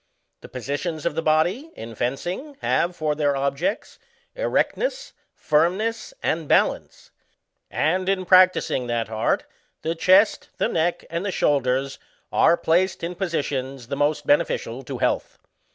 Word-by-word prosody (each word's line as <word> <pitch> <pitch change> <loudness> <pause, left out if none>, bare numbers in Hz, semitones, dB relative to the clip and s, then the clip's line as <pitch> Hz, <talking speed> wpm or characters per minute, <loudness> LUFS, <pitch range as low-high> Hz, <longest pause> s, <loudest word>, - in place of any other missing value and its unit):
The - - -13
positions 145 +5 -4
of 170 - 0
the 165 - -2
body, 175 - +1
in 115 0 -8
fencing, 175 - -4
have, 175 +1 +1
for 155 -3 -1
their 145 -1 +1
objects, 140 - -2 0.4
erectness, - - -1 0.2
firmness, 190 +9 0
and 160 -1 -1
balance; - - 0 0.6
and, 185 +5 0
in 190 -1 0
practising 185 -8 +4
that 115 -2 -2
art, 110 0 0 0.4
the 165 - 0
chest, 185 +5 +3
the - - +1
neck, 170 +2 0
and 170 +2 -2
the 200 - -2
shoulders, 135 -3 0 0.3
are 170 +1 +4
placed 180 +3 +1
in 170 +1 -2
positions 135 -8 -3
the 140 - -2
most 145 +2 0
beneficial 135 -3 +1
to. 130 0 -5
health. - - -1
160 Hz, 135 wpm, -23 LUFS, 140-185 Hz, 0.6 s, practising